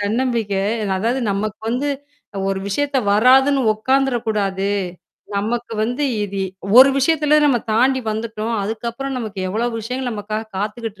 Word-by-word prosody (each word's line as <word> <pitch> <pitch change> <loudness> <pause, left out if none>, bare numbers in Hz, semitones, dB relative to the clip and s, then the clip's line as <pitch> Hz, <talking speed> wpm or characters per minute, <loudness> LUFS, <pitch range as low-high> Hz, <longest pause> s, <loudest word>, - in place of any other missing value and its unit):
தன்னம்பிக்கை 220 -2 0 0.4
அதாவது 235 +6 0
நமக்கு 205 +2 -2
வந்து, 250 +5 -1 0.5
அ - - -2
ஒரு 195 0 -1
விஷயத்த 280 +7 -1 0.2
வராதுன்னு 265 +6 +5
ஒக்காந்துரக் 260 +1 0
கூடாது. 195 -2 0 0.7
நமக்கு 230 +4 -2
வந்து 245 +6 -1 0.2
இது 200 0 -5 0.4
ஒரு 270 +1 +9
விஷயத்துல 300 +1 +3
நம்ம 265 -4 +3 0.2
தாண்டி 260 +4 +3
வந்துட்டோம். 220 +1 -3
அதுக்கப்புறம் 235 +6 -4
நமக்கு, 215 -5 -6
எவ்ளோ 220 +5 -1
விஷயங்கள் 250 +3 -3
நமக்காகக் 215 0 -5
காத்துகிட்டு 215 +1 -4
230 Hz, 130 wpm, -20 LUFS, 210-260 Hz, 0.7 s, ஒரு